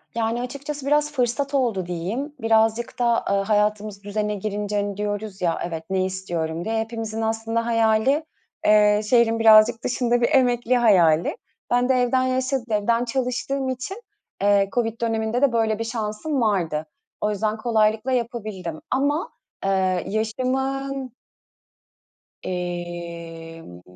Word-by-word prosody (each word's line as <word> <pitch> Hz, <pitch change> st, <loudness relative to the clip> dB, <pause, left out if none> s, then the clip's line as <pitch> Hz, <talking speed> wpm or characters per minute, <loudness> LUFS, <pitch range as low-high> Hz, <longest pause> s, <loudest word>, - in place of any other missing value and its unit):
Yani 230 Hz, +1 st, 0 dB
açıkçası 280 Hz, +3 st, -6 dB
biraz 295 Hz, +1 st, +2 dB
fırsat 275 Hz, +1 st, -1 dB
oldu 230 Hz, -9 st, +1 dB
diyeyim. 195 Hz, -, -4 dB
Birazcık 225 Hz, +2 st, +1 dB
da, 235 Hz, -1 st, +2 dB
eee, 200 Hz, -, +2 dB
hayatımız 210 Hz, 0 st, 0 dB
düzene 210 Hz, 0 st, -2 dB
girince, 205 Hz, +1 st, -3 dB
hani, 205 Hz, -1 st, -1 dB
diyoruz 205 Hz, -1 st, -4 dB
ya, 170 Hz, -2 st, 0 dB
"Evet, 165 Hz, -2 st, -5 dB
ne 190 Hz, -1 st, +1 dB
istiyorum?" 175 Hz, -3 st, -3 dB
diye. 225 Hz, 0 st, -1 dB
Hepimizin 225 Hz, -1 st, -4 dB
aslında 225 Hz, +1 st, -1 dB
hayali, 230 Hz, +6 st, +2 dB, 0.4 s
eee, 210 Hz, 0 st, +5 dB
şehrin 235 Hz, -2 st, +4 dB
birazcık 225 Hz, +1 st, +6 dB
dışında 245 Hz, -1 st, +1 dB
bir -, -, +3 dB
emekli 250 Hz, -3 st, +3 dB
hayali. 175 Hz, -9 st, +4 dB, 0.3 s
Ben 245 Hz, +1 st, +2 dB
de 260 Hz, -, +5 dB
evden 255 Hz, +1 st, +2 dB
yaşa 260 Hz, +1 st, 0 dB
evden 230 Hz, +3 st, +1 dB
çalıştığım 260 Hz, +2 st, -2 dB
için, 260 Hz, -, -5 dB, 0.4 s
eee, 200 Hz, -1 st, +3 dB
COVID 230 Hz, -1 st, -1 dB
döneminde 225 Hz, +1 st, 0 dB
de 280 Hz, -3 st, +4 dB
böyle 225 Hz, -1 st, +1 dB
bir -, -, -1 dB
şansım 230 Hz, +5 st, -2 dB
vardı. 170 Hz, -8 st, 0 dB, 0.4 s
O 210 Hz, -, +1 dB
yüzden 215 Hz, +2 st, -1 dB
kolaylıkla 220 Hz, +1 st, +1 dB
yapabildim 215 Hz, -9 st, -3 dB
ama, 290 Hz, -, 0 dB, 0.4 s
eee, 185 Hz, -2 st, +1 dB
yaşımın 260 Hz, +4 st, -2 dB, 1.3 s
Emm, 170 Hz, -, -6 dB
225 Hz, 130 wpm, -23 LUFS, 200-245 Hz, 1.3 s, birazcık